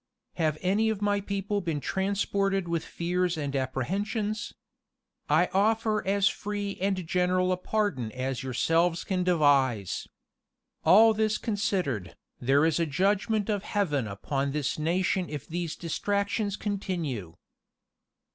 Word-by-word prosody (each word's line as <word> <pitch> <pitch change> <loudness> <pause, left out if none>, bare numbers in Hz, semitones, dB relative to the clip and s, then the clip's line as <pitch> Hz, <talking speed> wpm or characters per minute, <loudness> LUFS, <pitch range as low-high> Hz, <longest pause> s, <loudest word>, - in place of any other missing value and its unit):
"Have 155 -3 +1
any 205 +4 +2
of 220 -3 -1
my 205 -1 +1
people 200 +1 -2
been 165 -5 -2
transported 195 +1 0
with 170 -1 -1
fears 180 0 -1
and 145 -2 -3
apprehensions? 200 - -2 0.8
I 160 +4 +4
offer 215 +2 +2
as 200 0 +3
free 205 -2 -3
and 190 -2 0
general 180 +1 +2
a 185 - +1
pardon 185 - -1
as 130 +1 -3
yourselves 165 +7 +1
can 185 -2 -1
devise. 140 - +2 0.8
All 220 +4 +7
this 215 0 +1
considered, 190 - -2 0.2
there 135 +4 +3
is 165 0 +2
a 165 - +1
judgment 200 - +1
of 205 -3 0
Heaven 150 - -1
upon 135 +8 -2
this 150 0 -1
nation 180 +3 0
if 150 -3 -6
these 170 -1 -3
distractions 200 +4 -1
continue. 165 - -3
180 Hz, 130 wpm, -28 LUFS, 150-205 Hz, 0.8 s, All